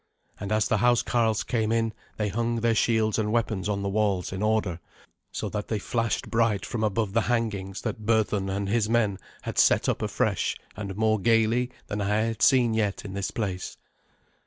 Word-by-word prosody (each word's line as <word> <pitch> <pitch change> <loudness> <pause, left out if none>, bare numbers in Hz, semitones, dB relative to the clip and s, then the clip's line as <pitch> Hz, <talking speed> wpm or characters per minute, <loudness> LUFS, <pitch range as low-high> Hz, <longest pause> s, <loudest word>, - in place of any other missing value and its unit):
And 100 +1 -5
as 110 0 +2
the 110 - +2
housecarls 115 -1 +2
came 110 -3 0
in 115 -1 +1 0.2
they 105 -1 0
hung 115 +3 -1
their 115 0 +3
shields 110 -1 +2
and 105 -1 0
weapons 110 -4 0
on 100 -1 -1
the - - -1
walls 100 -3 0
in 95 - -4
order, 105 -5 0 0.5
so - - -3
that 105 -1 -4
they 110 - -1
flashed 115 +2 -2
bright 115 -3 +1
from 115 -2 -3
above 105 -1 0
the 115 - +3
hangings 105 -5 -1
that 110 -1 -4
Berthun 105 -3 +1
and 100 +1 -2
his 110 +1 +1
men 110 -5 +1 0.2
had - - -2
set - - +4
up - - 0
afresh - - 0 0.2
and 100 -2 -6
more 110 0 +2
gaily 115 +3 +2 0.2
than 105 0 -3
I 105 +2 +1
had 115 0 -2
seen 125 -4 +5
yet 105 -3 -1
in 95 - -6
this 100 -1 -2
place. 95 -5 -4
110 Hz, 190 wpm, -26 LUFS, 100-115 Hz, 0.5 s, seen